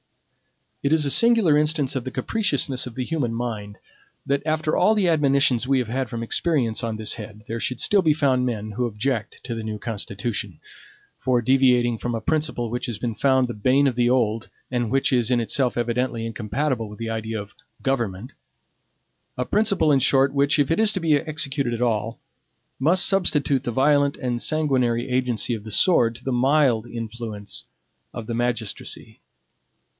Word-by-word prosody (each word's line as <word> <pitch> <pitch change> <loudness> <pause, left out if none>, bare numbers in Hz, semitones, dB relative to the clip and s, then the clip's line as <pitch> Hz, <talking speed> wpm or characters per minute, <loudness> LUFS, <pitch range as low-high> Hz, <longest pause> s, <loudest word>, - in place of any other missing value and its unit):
It 140 - 0
is 160 -2 +3
a 140 - +1
singular 225 - +4
instance 150 -3 0
of 130 -2 -3
the - - -3
capriciousness 140 - -1
of 120 - -10
the 130 - -2
human 125 -6 -2
mind, 110 -4 -5 0.5
that 140 0 0
after 155 0 0
all 220 - +3
the 200 -4 +2
admonitions 140 -6 +2
we 135 0 +3
have 125 -4 -1
had 130 0 -2
from 115 0 -4
experience 120 -4 0
on 115 -1 -2
this 110 -1 +1
head, 105 -1 -9
there 115 +1 -4
should 125 +1 -3
still 205 -1 +4
be 155 -4 +2
found 135 -4 +2
men 110 -3 -4
who 120 +4 -1
object 115 +1 -3
to 125 - -4
the 115 - -4
new 110 -1 -4
Constitution, 105 -3 -4 0.6
for 125 -2 +1
deviating 125 -2 +3
from 120 -1 -3
a - - -2
principle 150 -4 -1
which 125 +1 -3
has 120 -4 -4
been 115 +1 -3
found 130 +2 +2
the 120 - -5
bane 130 +7 +2
of 135 - +2
the 120 0 +1
old, 115 -3 0 0.2
and 120 -3 -1
which 135 +2 +1
is 120 -2 +2
in 125 -2 +2
itself 125 +2 0
evidently 120 0 -1
incompatible 115 +1 -2
with 105 - -11
the 115 -1 -4
idea 110 0 -3
of 100 0 -9 0.3
GOVERNMENT; 120 -3 -2 1.0
a 125 - -1
principle, 200 - +2
in 140 - +4
short, 135 +1 +3
which, 140 +1 +2
if 145 +1 +1
it 165 - +1
is 220 -1 +5
to 190 - -1
be 165 -3 +2
executed 145 -4 0
at 115 - -6
all, 115 -1 -1 0.6
must 175 +7 +4
substitute 150 -8 +2
the 120 - -1
violent 140 +3 +2
and 120 -2 -3
sanguinary 130 -6 +1
agency 125 -2 0
of 110 -3 -5
the 110 - -9
sword 115 - +3
to 120 - -11
the 135 - -1
mild 125 -2 +2
influence 115 -3 -6 0.5
of 115 - -6
the 115 - -4
magistracy. 120 -2 -3
125 Hz, 185 wpm, -23 LUFS, 115-140 Hz, 1.0 s, is